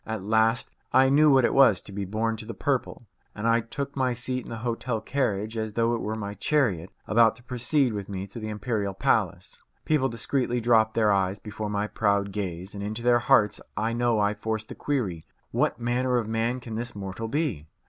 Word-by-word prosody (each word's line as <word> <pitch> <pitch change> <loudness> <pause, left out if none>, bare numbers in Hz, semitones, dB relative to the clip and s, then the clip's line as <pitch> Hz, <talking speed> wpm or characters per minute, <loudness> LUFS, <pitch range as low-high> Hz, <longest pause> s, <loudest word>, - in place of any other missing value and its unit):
At 110 -3 -4
last 110 +3 +2 0.2
I 130 0 +5
knew 150 +2 +6
what 135 -3 +5
it - - +1
was 130 -9 +6
to - - -11
be 100 0 -4
born 110 +3 -1
to 110 - -6
the 115 - -6
purple, 130 -3 -2 0.3
and 105 +2 -2
I 115 0 +4
took 140 +5 -5
my 130 -2 +1
seat 125 +1 -3
in - - -11
the 115 - -5
hotel 115 0 -1
carriage 110 -3 -1
as 110 -1 -3
though 115 +1 +1
it 115 - -2
were 110 +1 -2
my 100 -2 -5
chariot 105 - 0 0.2
about 115 0 +4
to 120 - -16
proceed 125 +1 +1
with 100 -2 -5
me 95 -1 -4
to 100 +4 -9
the 110 -1 -5
imperial 105 -2 -2
palace. 95 - 0 0.2
People 140 -4 +2
discreetly 125 +1 -1
dropped 110 -2 +3
their 110 -2 +3
eyes 95 0 +1
before 105 0 -6
my 105 0 -1
proud 100 -2 0
gaze, 95 -2 -5
and 100 -1 -6
into 110 +3 -4
their 120 0 +4
hearts 110 -5 +3 0.2
I 110 +2 0
know 120 -2 +1
I 105 0 +2
forced 110 +1 -4
the - - -6
query, 105 - -2 0.3
What - - 0
manner 125 +1 +1
of 115 -3 -1
man 115 +3 -1
can 115 -2 -8
this 120 +1 -4
mortal 100 +2 -5
be? 125 - -2
110 Hz, 215 wpm, -26 LUFS, 105-120 Hz, 0.3 s, knew